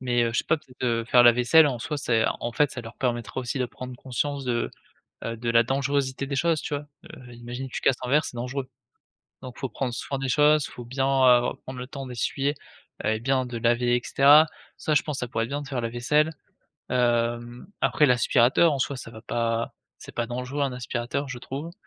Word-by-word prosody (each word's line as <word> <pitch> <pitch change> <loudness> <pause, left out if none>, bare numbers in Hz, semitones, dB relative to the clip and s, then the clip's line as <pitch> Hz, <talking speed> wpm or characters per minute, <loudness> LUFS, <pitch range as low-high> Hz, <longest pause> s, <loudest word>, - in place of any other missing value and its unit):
Mais 120 -2 +1
heu, 115 - -1
je - - +2
sais - - 0
pas, 160 - +2
peut-être, 130 -4 -16
heu, 115 -1 0
faire 125 0 +6
la 120 -1 +8
vaisselle 125 +7 +5
en 130 -4 -1
soi 150 +5 -3
c'est 115 -5 +1 0.2
en 120 - -3
fait 145 +3 +2
ça 120 - -6
leur 115 +1 -11
permettra 120 0 -2
aussi 125 +2 -3
de 125 - +1
prendre 125 +1 -8
conscience 140 +2 -3
de, 120 -2 -1 0.5
heu, 115 0 -4
de 115 +1 -2
la 115 0 +5
dangerosité 135 +1 -1
des 140 - -3
choses, 165 +2 +1
tu - - -6
vois? 145 +1 -4 0.3
Heu, 120 -1 -12
imagine 120 +3 -7
que - - -14
tu - - -3
casses 130 - +3
un - - -3
verre, 150 +4 +3
c'est - - -6
dangereux. 130 +2 -4 0.7
Donc 125 -1 -9
il - - -12
faut 135 - -2
prendre 125 +2 -3
soin 135 +3 -4
des 135 -1 -3
choses, 150 +1 +4
il - - -15
faut 120 - -9
bien, 135 +2 -1
heu, 130 -3 +4
prendre 130 -1 -7
le 125 - -5
temps 135 -1 -7
d'essuyer 135 +3 -1 0.5
et 110 0 +1
bien 130 +1 +1
de 120 -1 -5
laver 120 +1 +2
et 120 - -2
cetera. 145 +3 +6 0.3
Ça 155 - -1
je 145 - +4
pense 150 -3 -4
ça 125 - -2
pourrait 115 -1 -1
être 115 - -6
bien 145 +1 -2
de - - -9
faire 130 -3 -2
la 115 - -2
vaisselle. 150 +7 +1 0.6
Hem, 120 -1 0
après 150 - +4
l'aspirateur 125 +4 +4
en 135 - -3
soi 140 +1 -1
ça 115 - -9
va 110 -1 -11
pas 115 -1 -1 0.2
c'est - - -11
pas 120 - 0
dangereux 125 +4 -4
un 135 - -1
aspirateur 125 +3 -3
je 135 -2 -6
trouve. 145 +7 -6
125 Hz, 240 wpm, -25 LUFS, 120-140 Hz, 0.7 s, la